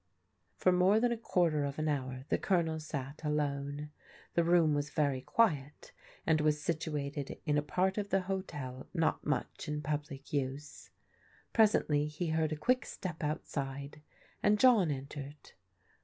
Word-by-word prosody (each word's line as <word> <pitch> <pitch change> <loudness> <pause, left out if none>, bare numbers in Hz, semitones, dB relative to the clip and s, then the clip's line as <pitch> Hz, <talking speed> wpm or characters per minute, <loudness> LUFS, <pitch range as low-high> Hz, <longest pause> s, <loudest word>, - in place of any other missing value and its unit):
For 185 - +4
more 185 +4 +4
than 240 +1 +2
a - - +1
quarter 170 -9 +1
of 140 0 -3
an 155 0 -1
hour 130 -3 -2
the - - +2
Colonel 165 -4 +1
sat 145 -1 -6
alone. 145 -1 -2 0.4
The 170 - +3
room 165 -2 +4
was 145 0 -1
very 140 -4 0
quiet 150 - 0 0.3
and 155 -1 +3
was 150 0 +2
situated 145 -3 -3
in 150 -2 +2
a 150 - +3
part 185 +7 0
of 205 -1 -3
the 195 - +2
hotel 150 -9 -5
not 165 -2 +1
much 145 -4 -2
in 150 0 -3
public 145 -1 -4
use. 145 +1 -3 0.6
Presently 155 -9 +4
he 155 +3 -3
heard 160 -1 +1
a - - 0
quick 255 - +1
step 170 -4 -5
outside, 140 -1 -4 0.4
and 210 0 +4
John 225 -9 +6
entered. 140 +1 -6
150 Hz, 155 wpm, -33 LUFS, 145-175 Hz, 0.6 s, John